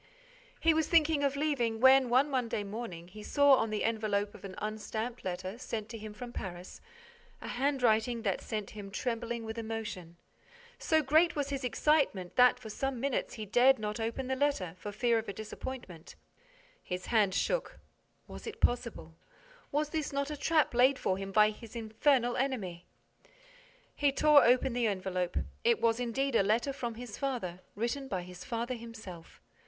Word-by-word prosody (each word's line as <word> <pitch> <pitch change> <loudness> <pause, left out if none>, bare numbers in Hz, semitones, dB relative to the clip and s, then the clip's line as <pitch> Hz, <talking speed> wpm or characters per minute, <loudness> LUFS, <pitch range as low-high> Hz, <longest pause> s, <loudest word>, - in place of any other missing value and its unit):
He 330 - +4
was 315 0 +1
thinking 315 -3 +4
of 280 0 +1
leaving, 270 -7 0
when, 260 0 +6
one 260 +4 +4
Monday 245 -6 -1
morning, 200 -5 -6
he 210 +3 -11
saw, 285 +5 +4
on 225 - 0
the 215 -1 -2
envelope 210 -2 0
of - - -14
an 190 -1 -7
unstamped 220 +3 -4
letter, 185 +4 -4
sent 225 -3 -4
on - - -25
to 230 - -6
him 215 0 -7
from 240 +3 -8
Paris, 180 -3 -7 0.6
a - - -8
handwriting 245 -3 +1
that 195 -4 0
set 215 -2 -4
him 205 -2 -8
trembling 235 +2 -3
with 220 +1 -5
emotion. 220 -7 -5 0.6
So 315 -1 +2
great 315 +5 +4
was 285 -2 -1
his 275 -1 -3
excitement 250 - +1
that, 250 0 +6
for 225 -3 -9
some 270 +2 -2
minutes, 275 +1 -1
he 215 - -5
dared 250 +6 +5
not 210 +1 -4
open 230 +4 -2
the 265 +1 -1
letter, 260 - 0
for 205 +4 -6
fear 230 +2 +2
of 220 -1 -6
a - - -3
disappointment. 210 -5 -8 0.7
His 180 0 -5
hand 205 -5 +2
shook. - - -1 0.5
Was - - -9
it 450 - -7
possible? 235 -9 -1 0.6
Was 295 +1 0
this 310 -1 -2
not 280 +1 -2
a - - -3
trap 310 0 +2
laid 255 +3 +5
for 190 -5 -1
him 195 0 -5
by 215 +1 +5
his 225 +2 -12
infernal 240 +2 +1
enemy? 200 -11 -2 1.1
He 285 -1 +2
tore 300 +1 +6
open 250 +1 +3
the 240 -1 +1
envelope. 185 -3 -2 0.3
It 465 -1 +3
was 230 0 +2
indeed 250 +2 -1
a - - +6
letter 225 +7 +1
from 240 -4 -4
his 235 -3 -8
father, 235 -11 -3 0.2
written 240 +5 -2
by 185 -7 -3
his 180 0 -10
father 235 +1 -3
himself. 220 -8 -10
235 Hz, 180 wpm, -31 LUFS, 210-270 Hz, 1.1 s, when